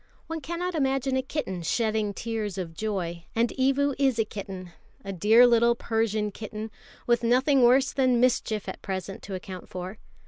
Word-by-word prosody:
One 325 Hz, -1 st, -5 dB
cannot 345 Hz, +5 st, -3 dB
imagine 270 Hz, -3 st, 0 dB
a 260 Hz, -, +2 dB
kitten 260 Hz, -, -4 dB
shedding 215 Hz, +3 st, 0 dB
tears 215 Hz, -2 st, -4 dB
of 175 Hz, -3 st, -4 dB
joy; 175 Hz, -3 st, -3 dB
and 230 Hz, +1 st, +2 dB
Evu 275 Hz, +2 st, +2 dB
is 265 Hz, -4 st, +3 dB
a 225 Hz, -, +2 dB
kitten, 190 Hz, -4 st, -7 dB, 0.3 s
a 195 Hz, -, -4 dB
dear 220 Hz, +7 st, +6 dB
little 235 Hz, 0 st, +4 dB
Persian 220 Hz, -2 st, -1 dB
kitten, 215 Hz, +1 st, -7 dB, 0.3 s
with 240 Hz, 0 st, +3 dB
nothing 260 Hz, +4 st, +4 dB
worse 260 Hz, +3 st, +5 dB
than 255 Hz, -3 st, +3 dB
mischief 230 Hz, -4 st, +1 dB
at -, -, -6 dB
present 190 Hz, 0 st, -5 dB
to 195 Hz, -, -6 dB
account 185 Hz, -1 st, -8 dB
for. 185 Hz, +3 st, -6 dB
225 Hz, 170 wpm, -27 LUFS, 195-260 Hz, 0.3 s, dear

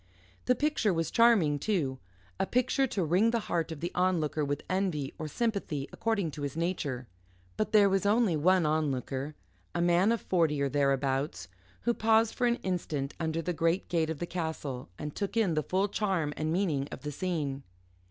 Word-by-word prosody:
The 250 Hz, -, +3 dB
picture 290 Hz, -6 st, +1 dB
was 165 Hz, -2 st, -1 dB
charming, 205 Hz, -12 st, +4 dB
too 145 Hz, -11 st, -1 dB, 0.4 s
a 190 Hz, -, +1 dB
picture 255 Hz, +2 st, +2 dB
to 200 Hz, -6 st, -1 dB
wring 185 Hz, +8 st, +3 dB
the 230 Hz, 0 st, 0 dB
heart 170 Hz, -4 st, -2 dB
of 160 Hz, -2 st, -7 dB
the 175 Hz, +2 st, -2 dB
onlooker 170 Hz, -4 st, +1 dB
with 145 Hz, 0 st, -2 dB
envy, 185 Hz, -7 st, -1 dB
or 155 Hz, -, -3 dB
sympathy, 175 Hz, -, -2 dB
according 210 Hz, -8 st, 0 dB
to 145 Hz, -, -8 dB
his 145 Hz, +1 st, -4 dB
nature. 150 Hz, -7 st, -2 dB, 0.5 s
But 215 Hz, -, -1 dB
there 210 Hz, -2 st, +6 dB
was 195 Hz, 0 st, +1 dB
only 205 Hz, -3 st, +3 dB
one 180 Hz, +3 st, +3 dB
onlooker, 145 Hz, -2 st, -1 dB, 0.4 s
a -, -, 0 dB
man 175 Hz, +4 st, +4 dB
of 230 Hz, -, +1 dB
forty, 165 Hz, -5 st, +1 dB
or 140 Hz, 0 st, +1 dB
thereabouts, 135 Hz, -, 0 dB, 0.3 s
who 235 Hz, -, +1 dB
paused 225 Hz, 0 st, +3 dB
for 245 Hz, -, +1 dB
an 240 Hz, -, +3 dB
instant 155 Hz, -7 st, -2 dB
under 165 Hz, 0 st, -1 dB
the 180 Hz, -, -1 dB
great 165 Hz, +3 st, 0 dB
gate 165 Hz, -2 st, +1 dB
of 160 Hz, -, -3 dB
the 175 Hz, -, -3 dB
castle 160 Hz, -, -4 dB
and 150 Hz, -1 st, -5 dB
took 205 Hz, +2 st, -3 dB
in 205 Hz, -7 st, +3 dB
the 155 Hz, -, +1 dB
full 190 Hz, +6 st, 0 dB
charm 190 Hz, -8 st, -1 dB
and 155 Hz, 0 st, -2 dB
meaning 160 Hz, -7 st, 0 dB
of -, -, -7 dB
the 150 Hz, -, -3 dB
scene. 145 Hz, -4 st, -2 dB
170 Hz, 190 wpm, -30 LUFS, 145-200 Hz, 0.5 s, there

